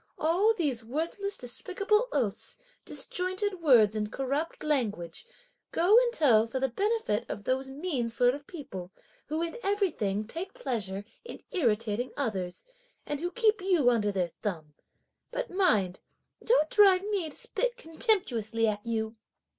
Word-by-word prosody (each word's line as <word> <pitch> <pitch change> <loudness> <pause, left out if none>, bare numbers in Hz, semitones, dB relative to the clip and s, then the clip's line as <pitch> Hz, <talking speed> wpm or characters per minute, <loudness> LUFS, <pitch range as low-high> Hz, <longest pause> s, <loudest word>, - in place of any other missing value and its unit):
All 370 +8 +3
these 275 - 0
worthless 335 - -2
despicable 395 - 0
oaths, 220 -7 -2 0.3
disjointed 370 +1 -1
words, 235 -9 +6
and 210 -1 -2
corrupt 280 +6 -2
language, 240 - -1 0.4
go 360 +6 +4
and 485 0 +5
tell 235 - +4
for 260 +3 -3
the 265 0 +1
benefit 395 - 0
of 205 - -5
those 265 +3 -1
mean 270 -4 -2
sort 245 +2 +3
of 285 +1 -8
people, 195 - -8 0.4
who 315 +2 -1
in 335 +6 -3
everything 315 - 0
take 345 - -6
pleasure 205 -6 -3 0.2
in 475 - -9
irritating 230 - 0
others, 195 - -2 0.4
and 290 -1 -3
who 350 +3 -2
keep 435 0 +2
you 350 -10 +3
under 210 -3 +1
their 180 -3 -1
thumb! 160 -8 -4 0.6
But - - -4
mind 220 - +2 0.4
don't 380 -10 +3
drive 390 -3 +6
me 400 -6 -1
to - - -11
spit - - 0
contemptuously 265 - 0
at 210 -1 -2
you." 220 -1 -2
285 Hz, 145 wpm, -29 LUFS, -, 0.6 s, words